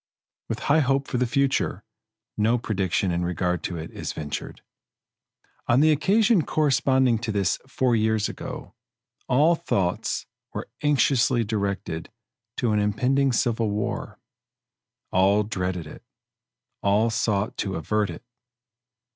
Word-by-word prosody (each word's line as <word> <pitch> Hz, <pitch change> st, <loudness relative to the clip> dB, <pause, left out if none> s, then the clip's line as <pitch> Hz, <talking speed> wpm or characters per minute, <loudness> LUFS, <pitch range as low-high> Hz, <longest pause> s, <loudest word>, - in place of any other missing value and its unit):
With -, -, -3 dB
high 150 Hz, +3 st, +3 dB
hope 135 Hz, -1 st, +1 dB
for 125 Hz, -, -2 dB
the 125 Hz, -, +1 dB
future, 140 Hz, +2 st, 0 dB, 0.5 s
no 115 Hz, +3 st, +2 dB
prediction 95 Hz, -5 st, -1 dB
in 85 Hz, +1 st, -1 dB
regard 90 Hz, 0 st, -1 dB
to 85 Hz, -, -3 dB
it 80 Hz, +1 st, -7 dB
is -, -, -5 dB
ventured. 75 Hz, -1 st, -6 dB, 1.0 s
On 120 Hz, -, +4 dB
the 155 Hz, +2 st, +5 dB
occasion 200 Hz, -, +3 dB
corresponding 130 Hz, -5 st, +2 dB
to 110 Hz, -1 st, -3 dB
this 100 Hz, -3 st, 0 dB
four 130 Hz, -2 st, +1 dB
years 110 Hz, -1 st, +1 dB
ago, -, -, -7 dB, 0.5 s
all 150 Hz, +7 st, +4 dB
thoughts 100 Hz, -, -1 dB, 0.3 s
were -, -, -4 dB
anxiously 135 Hz, -4 st, +3 dB
directed 100 Hz, -6 st, -3 dB, 0.5 s
to 120 Hz, -, +1 dB
an 105 Hz, -, +2 dB
impending 125 Hz, +7 st, +2 dB
civil 115 Hz, -3 st, +1 dB
war. 105 Hz, 0 st, -3 dB, 0.9 s
All 100 Hz, +3 st, +4 dB
dreaded 95 Hz, -5 st, -3 dB
it 75 Hz, -, -11 dB, 0.8 s
all 105 Hz, +3 st, +2 dB
sought 105 Hz, -2 st, 0 dB
to 95 Hz, -2 st, -2 dB
avert 105 Hz, +5 st, 0 dB
it. 85 Hz, +7 st, -8 dB
110 Hz, 130 wpm, -25 LUFS, 100-135 Hz, 1.0 s, the